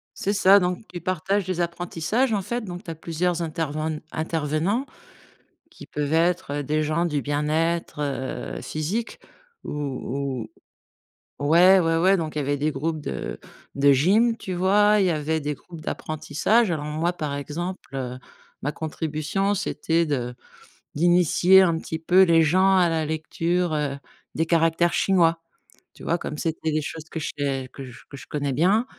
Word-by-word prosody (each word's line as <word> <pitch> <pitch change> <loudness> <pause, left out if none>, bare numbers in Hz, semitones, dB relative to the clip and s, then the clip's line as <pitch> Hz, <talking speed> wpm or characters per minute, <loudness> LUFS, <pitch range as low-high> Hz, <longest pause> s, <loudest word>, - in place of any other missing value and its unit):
C'est 200 - -1
ça, 200 0 +6
donc 180 +3 -2
tu 175 - -6
partages 185 +3 -1
des 180 -1 -2
apprentissages, 175 +8 -1
en 205 - +1
fait, 235 +6 -3
donc 180 0 -7
tu 175 - -6
as - - -6
plusieurs 170 +2 -1
interven 155 -1 -3
intervenants 160 - -1 0.9
qui - - -13
peuvent 150 0 -3
être, 170 -1 +2
heu, - - -2
des 155 +3 0
gens 155 +3 0
du 150 -4 -1
bien-être, 155 +3 -1
heu, 135 -3 -4
physique 180 +10 -3 0.5
ou 135 -3 -4 0.9
ou 145 - -2
ouais, 180 +4 +7
ouais, 165 -1 +1
ouais, 190 +3 +4
donc 160 -4 -4
il - - 0
y - - +1
avait 145 +1 0
des 150 +2 0
groupes 155 +3 -3
de - - -5 0.4
de 140 0 +5
gym, 210 - +3
tu 190 -5 -5
vois, 205 +4 +4
il 190 - +3
y - - +2
avait 155 0 -1
des 150 +1 -2
groupes 165 +3 -12
d'apprentissage. 155 +9 0
Alors 155 -3 -2
moi, 160 +3 -1
par 150 -5 -4
exemple, 165 +6 -4
heu, 125 -1 -4 0.4
ma 145 +2 -1
contribution, 160 +5 -2
c'était 170 -4 0
de 125 -5 -2 0.6
d'initier 175 +3 +5
un 170 -3 +3
petit 160 - -5
peu 180 +4 +5
les 165 -3 +5
gens 185 +5 +4
à 180 -2 +4
la 160 -1 0
lecture, 165 +2 -1
heu, 145 -2 -2 0.4
des 160 - 0
caractères 165 +1 +2
chinois, 170 -4 +3 0.5
tu - - -14
vois, 170 - +1
comme 150 - -6
c'était 160 0 -2
des 155 0 0
choses 155 +1 -6
que 160 - -5
je 155 - -3
sais 135 -2 -2
que 135 - -8 0.3
que 140 - -9
je - - -11
connais 145 -2 -2
bien, 195 - +3
165 Hz, 170 wpm, -24 LUFS, 150-180 Hz, 0.9 s, ouais